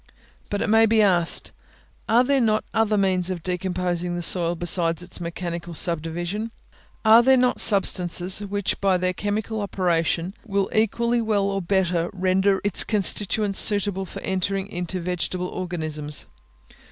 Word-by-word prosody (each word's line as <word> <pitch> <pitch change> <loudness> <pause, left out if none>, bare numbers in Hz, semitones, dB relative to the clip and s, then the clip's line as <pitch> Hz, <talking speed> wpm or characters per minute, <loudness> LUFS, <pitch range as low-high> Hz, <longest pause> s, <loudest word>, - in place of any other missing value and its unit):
But 205 - -2
it - - -2
may 225 +1 +4
be 220 0 +3
asked, 175 -4 +1 0.6
Are 235 +2 +5
there 275 +1 +1
not 215 -2 +1
other 220 -1 +1
means 190 -2 +1
of 175 -3 -5
decomposing 180 -1 -2
the 175 - -4
soil 170 0 +2
besides 170 0 +2
its 180 0 -7
mechanical 170 0 -5
subdivision? 175 +6 0 0.6
are 220 +2 +8
there 265 +2 +4
not 250 0 +1
substances, 185 -3 +2
which 205 -1 -3
by 195 -2 +2
their 185 0 -1
chemical 210 +3 -3
operation 175 -2 -1
will 200 -3 -2
equally 235 +2 +1
well 215 -3 0
or 195 0 -1
better 180 -2 0
render 190 +1 +1
its 205 -3 +1
constituents 205 -1 0
suitable 200 -2 +1
for - - -9
entering 190 +1 -2
into 180 +1 -4
vegetable 180 +1 -3
organisms? 155 -5 -3
190 Hz, 145 wpm, -23 LUFS, 175-205 Hz, 0.6 s, are